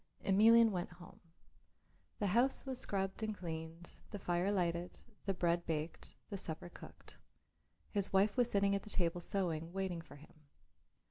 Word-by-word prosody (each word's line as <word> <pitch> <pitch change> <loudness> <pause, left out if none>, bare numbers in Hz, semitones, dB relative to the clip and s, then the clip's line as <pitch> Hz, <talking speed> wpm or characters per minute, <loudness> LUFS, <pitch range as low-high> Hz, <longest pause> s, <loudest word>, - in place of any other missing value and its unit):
Emelian 225 +3 +6
went 180 -3 -2
home. 175 0 -14 1.0
The 210 - -1
house 240 +9 +2
was 260 -2 -4
scrubbed 195 -1 -2
and 215 -1 -2
cleaned, 165 0 -6 0.2
the 205 - -5
fire 180 +1 0
lighted, 175 -2 -1 0.3
the 195 - +2
bread 175 -1 +1
baked, 160 0 -4 0.2
the 200 - -2
supper 170 -1 +1
cooked. - - -13 0.7
His 200 -2 0
wife 195 +2 +3
was 245 -1 +3
sitting 200 -1 +2
at 200 - 0
the 215 - -12
table 175 -3 0
sewing, 170 -4 -1
waiting 190 -3 -2
for 160 -3 -14
him. 145 +2 -16
190 Hz, 155 wpm, -36 LUFS, 170-205 Hz, 1.0 s, Emelian